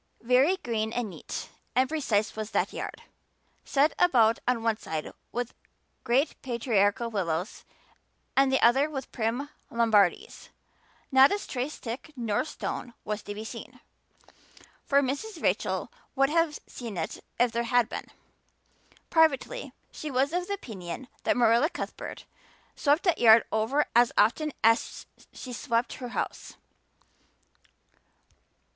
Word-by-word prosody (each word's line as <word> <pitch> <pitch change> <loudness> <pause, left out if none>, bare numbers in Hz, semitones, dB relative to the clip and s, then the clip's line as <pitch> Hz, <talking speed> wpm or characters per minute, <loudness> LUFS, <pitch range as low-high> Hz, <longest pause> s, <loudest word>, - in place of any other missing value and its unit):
Very 260 +10 +4
green 220 -8 -2
and 235 -4 -2
neat - - -7 0.3
and 260 +1 +4
precise 240 -9 0
was 215 -1 -4
that - - 0
yard, - - -6 0.6
set 290 +2 +2
about 230 -10 +4
on 245 -2 +1
one 225 -2 +1
side 160 -7 -5 0.2
with 245 0 -3 0.5
great 265 +6 +1
patriarchal 235 -2 +1
willows 180 -3 -2 0.7
and 270 0 +4
the 265 - +3
other 270 +6 +4
with 270 -3 -6
prim 240 +5 -2 0.2
Lombardies. 220 -6 +2 0.6
Not 265 +1 +7
a 405 - +2
stray 265 -8 -3
stick 265 +2 -7
nor 230 -3 -1
stone 245 -5 -5
was 210 0 -3
to 205 0 -7
be 215 - -6
seen, - - -9 1.0
for 280 0 +3
Mrs. 280 +12 -3
Rachel - - 0 0.2
would 275 +1 +3
have 330 -2 +2
seen 230 -6 -7
it 160 - -4 0.2
if 245 -1 +4
there 235 0 0
had 235 -1 +2
been. - - -6 1.0
Privately 320 - +2 0.2
she 305 - -6
was 270 +3 +1
of 355 0 -1
the 405 - -2
opinion 220 - -8 0.2
that - - +2
Marilla 235 +5 +4
Cuthbert - - -7 0.5
swept 295 +3 +2
that 355 -4 +2
yard 225 -1 +7
over 225 +7 +1
as 240 0 +5
often 295 +9 +3
as 225 +1 +2 0.3
she 250 - -8
swept 235 -1 -1
her 250 - -4
house. - - -4
245 Hz, 135 wpm, -28 LUFS, 225-280 Hz, 1.0 s, Not